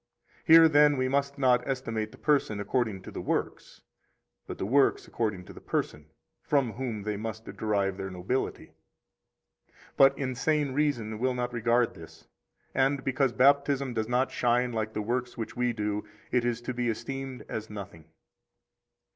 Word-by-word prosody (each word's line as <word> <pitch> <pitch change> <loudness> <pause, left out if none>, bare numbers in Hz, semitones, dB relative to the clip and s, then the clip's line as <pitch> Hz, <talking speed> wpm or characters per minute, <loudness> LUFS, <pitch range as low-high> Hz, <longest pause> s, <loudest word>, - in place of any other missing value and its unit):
Here, 165 -2 +9
then, 150 -2 +5
we 130 0 +1
must 140 +1 0
not 130 -3 +4
estimate 115 -5 -2
the - - -14
person 140 -8 +1
according 105 -3 -1
to - - -9
the - - -5
works, - - -3 0.6
but - - -6
the - - -3
works 135 +6 +2
according 105 -6 -2
to - - -11
the - - -12
person, 75 0 -3 0.3
from 135 -6 +1
whom 120 -5 -4
they 105 0 -2
must 110 +1 -6
derive 100 -3 -1
their 95 -1 -4
nobility. 95 +8 -3 1.0
13 - - -35 0.2
But 135 0 +6
insane 140 +2 0
reason 130 -7 -1
will 130 +1 0
not 125 0 -3
regard 120 0 +2
this, 80 -1 -14 0.5
and 135 +1 +1
because 135 0 +1
Baptism 140 0 +3
does 110 -1 -1
not 125 +2 +1
shine 125 0 +1
like 110 -1 -2
the 105 - -2
works 120 +2 -2
which 115 - -5
we 125 0 +1
do, 105 -2 -2 0.3
it 125 -1 +2
is 120 -1 -1
to 125 +2 -4
be 120 -1 -1
esteemed 130 +3 -5
as 110 0 -5
nothing. 100 -6 -9
120 Hz, 165 wpm, -28 LUFS, 110-135 Hz, 1.0 s, Here